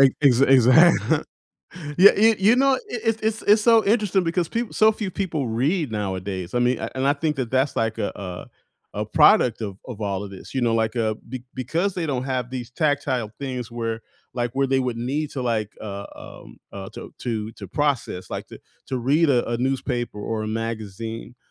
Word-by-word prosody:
Ex 135 -2 +6
exa 135 -1 +5
exact 145 +5 +5 0.7
Yeah, 195 +2 +9
you 220 +2 +6
you 220 - 0
you 215 +5 +4
know, 270 0 +4
it - - -4
it 225 -2 -1
it's 220 0 -1
it's 210 +1 +4
so 230 -1 +5
interesting 205 -3 +2
because 165 0 0
peop 235 0 -3
so 220 0 +5
few 210 -3 -4
people 160 -9 -2
read 135 - 0
nowadays, 95 -2 -4
I - - +2
mean, 125 0 +2
a - - -4
and 130 +1 0
I 140 - +5
think 150 0 -2
that's, 130 +2 0
like, 115 0 -1
a, 100 - -3
uh 90 -3 -7 0.5
a - - -2
product 115 -2 +4
of 100 -2 -5
of 120 -4 -8
all 100 -1 -2
of 100 - -8
this. 95 - -11
You 130 - 0
know, 115 -1 +2
like, 110 0 0
uh, 110 -2 +1
be 125 0 -7
because 165 - -1
they 170 -3 -2
don't 130 -3 -2
have 130 -2 -2
these 125 -2 -6
tactile 140 -7 0
things 125 -4 -5
where, 115 -1 -3 0.3
like, 120 -1 -1
where 135 0 +2
they 135 0 +2
would 125 -2 -2
need 140 +6 -2
to, 130 - -3
like, 110 -3 -1
uh, 100 -1 -6
um, - - -12 0.2
uh, 95 -1 -7
to - - -9
to 110 -2 -3
to 100 -4 -10
process, 125 -10 -1
like - - -5
to - - -12 0.3
to 130 - -3
read 145 +5 +3
a 120 -3 +2
a 120 - -1
newspaper 125 -3 -2
or 110 +1 -3
a 110 - -3
magazine, 115 +1 -5
125 Hz, 210 wpm, -23 LUFS, 115-155 Hz, 0.7 s, Yeah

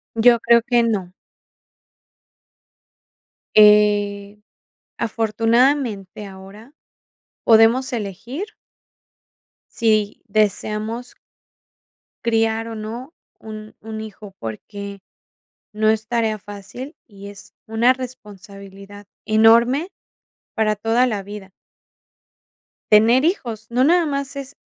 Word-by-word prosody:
Yo 235 +1 +5
creo 235 +1 +4
que 240 0 +2
no. 200 -6 -1 2.5
Eh, 205 -1 +4 0.6
afortunadamente, 225 -1 0
ahora 195 +6 -13 0.7
podemos 230 +3 +4
elegir 230 - -5 1.3
si 215 -3 +1
deseamos 215 +3 -1 1.1
criar 225 0 +1
o - - -6
no 230 +8 -7 0.3
un 215 -1 -10
un 220 0 -7
hijo, 210 -2 -10
porque 200 - -7 0.8
no 215 0 +2
es 220 0 -2
tarea 225 -3 0
fácil 205 - -10
y 200 -2 -12
es 200 -1 -13
una 225 +3 +3
responsabilidad 205 -5 -11 0.2
enorme 235 - +4 0.7
para 215 -1 +1
toda 225 +4 +2
la 210 -5 -2
vida. 200 -1 -10 1.4
Tener 230 +6 +5
hijos, 235 - -2
no 250 +2 +2
nada 340 +4 +4
más 280 -2 -3
es, 275 0 -8
220 Hz, 90 wpm, -20 LUFS, 205-240 Hz, 2.5 s, Yo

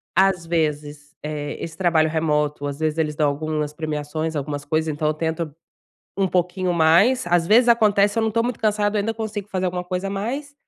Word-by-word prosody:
às 190 -3 +3
vezes, 150 -2 -2
eh, 150 -1 -4
esse 165 -1 -7
trabalho 165 -4 +2
remoto 150 -2 0
às 140 0 -5
vezes 155 0 -1
eles 150 -2 0
dão 150 -1 +2
algumas 150 0 -3
premiações, 155 +1 -3
algumas 145 0 -4
coisas, 155 +1 0
então 150 +1 -1
eu 155 - +2
tento 160 -1 -3 0.6
um 195 -1 +2
pouquinho 180 0 0
mais, 170 +10 +4
às 175 -1 +2
vezes 235 +4 +5
acontece, 210 -3 +4
se 225 - 0
eu - - +1
não 220 - +1
estou 230 +1 0
muito 245 -2 -3
cansada, 210 -1 +1
ainda 225 +2 -1
consigo 220 -2 -5
fazer 185 -2 -2
alguma 180 0 -2
coisa 180 +2 -3
mais 260 +9 -4
165 Hz, 195 wpm, -22 LUFS, 150-200 Hz, 0.6 s, vezes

